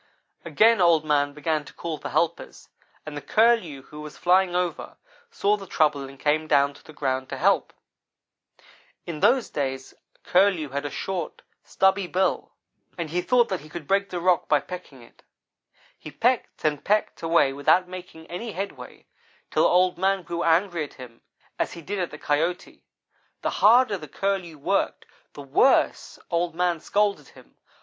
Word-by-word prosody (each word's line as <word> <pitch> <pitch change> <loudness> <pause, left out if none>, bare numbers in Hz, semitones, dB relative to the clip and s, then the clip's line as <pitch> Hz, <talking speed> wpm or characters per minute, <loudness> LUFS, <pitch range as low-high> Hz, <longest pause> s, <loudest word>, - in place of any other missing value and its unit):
"Again 225 -2 +4
Old 165 -3 +4
man 145 -1 +2
began 150 +1 -2
to - - -14
call 165 -3 -5
for - - -6
helpers, 170 0 -2 0.4
and 155 -1 -7
the 145 - -5
Curlew, 210 - +2
who 150 +2 -11
was 150 -1 -10
flying 180 0 +3
over, 180 -1 -3 0.3
saw 210 - +1
the 195 -1 -10
trouble, 145 -5 +1
and 135 0 -15
came 155 +1 +1
down 140 -1 +3
to - - -18
the - - -13
ground 130 -3 -2
to - - -5
help. - - +2 1.3
In 165 -3 -6
those 250 - +3
days 135 -2 -3 0.3
Curlew 180 -5 +2
had 140 +2 -4
a - - -2
short, 180 +1 -5 0.2
stubby 190 0 +1
bill, 185 +2 -1 0.5
and 165 -3 -4
he 180 +1 0
thought 240 +5 +3
that 190 - -2
he 155 - -14
could 150 -2 -8
break 200 0 +1
the 180 - -4
rock 180 0 +2
by 150 - +4
pecking 150 -7 -10
it. 115 - -21 0.8
He - - -9
pecked 235 - -1
and 150 -2 0
pecked 210 +1 0
away 165 -5 +3
without 145 +6 +3
making 180 -3 -10
any 200 +7 -6
headway, 195 +2 -7 0.5
till - - +3
Old 180 0 +2
man 195 0 +1
grew 170 0 -4
angry 170 0 +2
at 145 - -10
him, 120 -3 -12 0.4
as - - -1
he 170 - -9
did 200 +4 -4
at 180 - -1
the 150 - -10
Coyote. 160 +5 -2 0.6
The - - 0
harder 220 -2 +4
the 155 - -9
Curlew 185 -1 -3
worked, 140 - -1 0.3
the 145 - -9
worse 140 - +2
Old 170 -1 0
man 175 -1 0
scolded 205 +4 0
him. - - -19
170 Hz, 175 wpm, -25 LUFS, 150-190 Hz, 1.3 s, Again